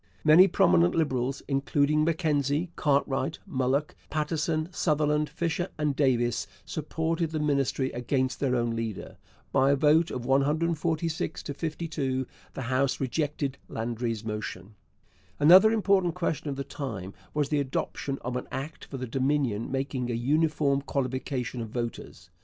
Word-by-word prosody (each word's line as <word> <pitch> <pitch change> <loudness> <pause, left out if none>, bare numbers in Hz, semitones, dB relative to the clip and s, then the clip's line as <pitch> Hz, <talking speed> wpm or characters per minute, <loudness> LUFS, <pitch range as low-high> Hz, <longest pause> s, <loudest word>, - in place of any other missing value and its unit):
Many 160 +5 +8
prominent 85 - +4
Liberals 135 -4 0
including 145 +2 +2
Mackenzie, 155 -1 0
Cartwright, 140 -2 +1
Mulock, 130 +3 0
Paterson, 155 +1 -1
Sutherland, 150 -3 +1
Fisher, 170 +3 -2
and 150 -2 0
Davies 120 -4 +1 0.2
supported 160 +2 -2
the 155 -1 -3
Ministry 140 -3 0
against 130 +2 -1
their 130 -3 +1
own 120 -1 0
leader. 115 -3 -5 0.3
By 135 0 +4
a 140 - +5
vote 155 +4 +4
of 125 -1 -5
146 160 +4 0
to 145 - -4
52 150 -4 -2 0.3
the - - -4
House 130 +2 +1
rejected 140 0 -2
Landry's 115 -1 -3
motion. 105 -2 -5 0.7
Another 185 +9 +8
important 195 -5 +2
question 160 -4 -2
of 140 - -3
the 140 - -3
time 105 -11 -6 0.2
was 145 -2 +1
the 150 - +1
adoption 135 0 -2
of 125 +1 -4
an 125 - -3
Act 135 +4 -5
for 135 - -7
the 130 - -4
Dominion 130 -3 0
making 135 -2 -2
a 120 - -1
uniform 145 +2 +2
qualification 130 -2 -2
of 115 - -5
voters. 120 +1 -6
140 Hz, 140 wpm, -28 LUFS, 130-155 Hz, 0.7 s, Many